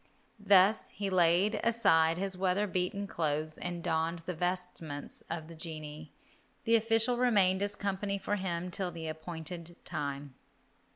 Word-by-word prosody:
Thus 200 0 +5
he 200 -1 -4
laid 180 +3 +3
aside 165 -8 +4
his 190 0 -2
weather 190 +2 +1
beaten 185 +1 -1
clothes 155 -3 -2
and 175 -1 -4
donned 165 +1 0
the 180 - -2
vestments 175 -4 -4
of 160 -1 -4
the 165 - -10
genii. 155 -2 -7 0.5
The 230 - +4
official 225 +2 +3
remained 200 -6 +3
as 205 0 -1
company 200 0 -2
for 205 +1 -1
him 180 -2 -3
till 185 +1 -1
the 165 -2 -6
appointed 160 +1 -6
time. 140 -2 -4
180 Hz, 140 wpm, -32 LUFS, 160-200 Hz, 0.5 s, Thus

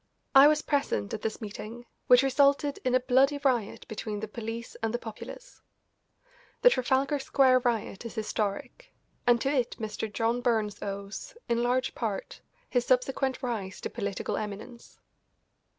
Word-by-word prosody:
I 275 +1 +9
was 300 0 +3
present 190 - -1
at - - -3
this 220 +2 -3
meeting, 220 +3 -7 0.2
which 250 +1 +7
resulted 280 +1 +3
in 255 0 +2
a - - +5
bloody 265 +3 +3
riot 245 -7 0
between 215 -1 -4
the 220 - -4
police 225 +1 -6
and 225 -1 0
the 240 - 0
populace. 240 - -10 1.0
The - - +8
Trafalgar 270 - +1
Square 265 -1 +4
Riot 230 -5 -1
is 230 - -7
historic, 220 - -3 0.3
and 240 -1 +5
to 275 - +1
it 250 -4 0
Mr. 220 -1 -4
John 230 +4 0
Burns 220 -4 0
owes, 200 - -6
in 235 0 +1
large 250 +1 +1
part, 215 -5 -4 0.3
his 245 -2 +1
subsequent 260 +1 +1
rise 210 -7 -3
to - - -4
political 200 -4 -3
eminence. 215 +3 -7
240 Hz, 150 wpm, -28 LUFS, 215-265 Hz, 1.0 s, I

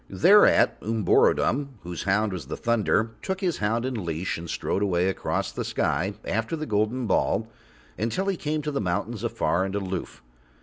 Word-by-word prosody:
Thereat - - +5
Umborodom, 115 +5 +2
whose 85 -1 -6
hound 100 +1 +1
was 80 -8 -6
the - - -5
thunder, 115 -1 +1
took 190 0 -3
his 180 -5 0
hound 115 +3 0
in 125 -6 -3
leash, 85 +2 -2
and 85 0 -7
strode 100 - -1
away 90 -3 +1
across 95 - -2
the - - -4
sky 95 +8 -1
after 110 +9 -1
the 155 -1 -4
golden 110 +2 0
ball - - +1 0.5
until 115 - -1
he 195 -1 0
came 155 -2 -2
to 150 - -2
the 140 - -1
mountains 90 -3 -2
afar 90 - 0
and 95 +1 -3
aloof. 95 -7 -4
105 Hz, 175 wpm, -26 LUFS, 95-130 Hz, 0.5 s, Thereat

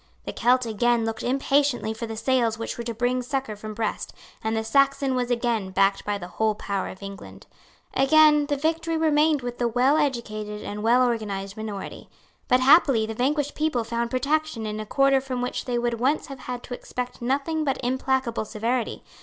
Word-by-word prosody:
The - - -5
Celt 250 +1 +3
again 230 +1 +1
looked 225 0 -3
impatiently 275 -2 +1
for 230 +1 -5
the 225 0 -6
sails 235 -2 +1
which 230 - -4
were 235 - -5
to 235 - -3
bring 245 +2 0
succour 265 -3 -3
from 215 +1 -8
Brest; 220 -1 -3 0.3
and 220 0 -1
the 220 - -1
Saxon 275 +3 +2
was 250 -1 -1
again 235 -5 0
backed 195 +1 +2
by 205 0 -1
the 175 -3 -8
whole 215 +3 0
power 200 -2 -3
of 190 - -10
England. 200 0 -9 0.5
Again 300 +1 +5
the 290 - 0
victory 325 +2 0
remained 305 -2 +3
with 245 0 -5
the 240 - +2
well 250 +5 +3
educated 215 -7 -2
and 210 0 -5
well 240 +3 +4
organized 200 -4 -3
minority. 215 -2 -7 0.4
But, 255 +1 +4
happily, 270 -4 +5
the 225 - -5
vanquished 285 +5 0
people 300 -6 0
found 235 +1 -2
protection 275 -1 -1
in 215 0 -4
a 215 - -6
quarter 275 +1 +3
from 260 -2 -4
which 250 0 -3
they 245 -1 -1
would 240 -1 -1
once 275 +5 +1
have 275 -2 -9
had 245 -1 -6
to 250 - -7
expect 250 0 -6
nothing 280 +6 0
but 275 -2 0
implacable 260 -2 0
severity. 230 +3 -2
245 Hz, 195 wpm, -25 LUFS, 220-275 Hz, 0.5 s, Again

